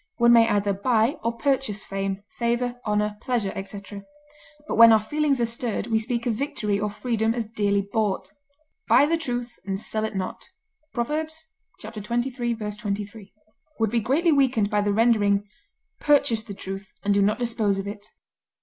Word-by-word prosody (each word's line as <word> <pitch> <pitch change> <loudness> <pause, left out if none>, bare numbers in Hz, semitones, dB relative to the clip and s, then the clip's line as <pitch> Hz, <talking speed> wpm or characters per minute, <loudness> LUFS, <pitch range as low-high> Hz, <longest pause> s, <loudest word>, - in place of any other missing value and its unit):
One 235 0 +6
may 230 -1 +6
either 205 -1 +1
buy 225 +4 +1
or 230 +1 -1
purchase 270 -7 0
fame, 195 0 -3 0.2
favor, 240 +1 -1
honor, 210 0 0
pleasure, 235 -6 -1
etc., 200 +1 -7 0.6
but - - -2
when 230 0 +9
our 220 - +6
feelings 285 +5 0
are 235 - +3
stirred 230 -2 -2
we 225 -1 +1
speak 235 +1 -2
of 240 - +1
victory 210 -5 -2
or 210 +1 -1
freedom 225 +1 -1
as 235 -2 -2
dearly 205 -2 0
bought. 195 -4 -1 0.6
"Buy 285 - +6
the 325 +3 +2
truth, 245 -6 -4
and 195 0 -3
sell 215 +1 -2
it 220 -1 -3
not" 185 -1 -4 0.4
(Prov. 300 +6 -2 0.5
xxiii, 220 0 -8
23) 215 -3 -3 0.5
would 220 -2 +1
be 235 - +2
greatly 285 - +2
weakened 255 -7 +2
by 210 -1 +2
the 205 0 +1
rendering 205 -2 +3 0.5
"Purchase 285 -6 +3
the 215 -3 -9
truth, 195 +1 -7
and 205 - +2
do 200 - +3
not 205 +2 +2
dispose 230 -5 0
of 195 - -3
it." 205 0 -6
220 Hz, 170 wpm, -25 LUFS, 205-240 Hz, 0.6 s, when